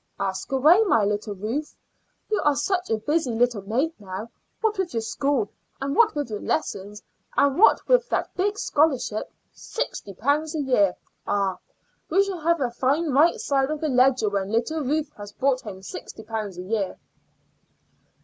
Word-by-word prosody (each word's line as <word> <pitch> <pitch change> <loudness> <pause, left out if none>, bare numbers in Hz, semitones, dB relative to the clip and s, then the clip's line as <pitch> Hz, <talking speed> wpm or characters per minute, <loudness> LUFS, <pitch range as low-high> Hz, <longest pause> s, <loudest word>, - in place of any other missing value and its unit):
"Ask 195 +3 -3
away, 305 +9 +6
my 225 - +3
little 205 0 -2
Ruth. 230 +10 -4 0.6
You 425 - +2
are 295 -1 +3
such 360 +6 -1
a 225 - +2
busy 295 +5 0
little 240 -2 +2
maid 250 +11 0
now, 200 +3 -7 0.3
what 435 -3 0
with 350 -9 -2
your 225 - +1
school, 265 -1 -1 0.3
and 275 +1 -2
what 450 -5 +4
with 290 -6 -3
your 210 - -4
lessons, 210 -8 -3 0.3
and 280 +3 +3
what 445 - +5
with - - +3
that - - -1
big 410 +3 0
scholarship 280 - +1 0.2
sixty 205 - -5
pounds 295 - 0
a 305 - 0
year. 205 -9 +3 0.3
Ah! 195 -2 0 0.5
we 390 - +4
shall 390 -3 -4
have 335 0 +1
a 245 -2 0
fine 280 +6 +1
right 300 +6 +4
side 270 -1 +1
of 305 0 -2
the 310 - -1
ledger 255 -3 +4
when 200 -1 -1
little 240 +8 0
Ruth 300 +2 -1
has 205 0 -9
brought 265 -1 +1
home 190 -3 -9
sixty 220 - -8
pounds 215 -4 -4
a 180 - -5
year." 200 0 -2
265 Hz, 175 wpm, -25 LUFS, 210-310 Hz, 0.6 s, away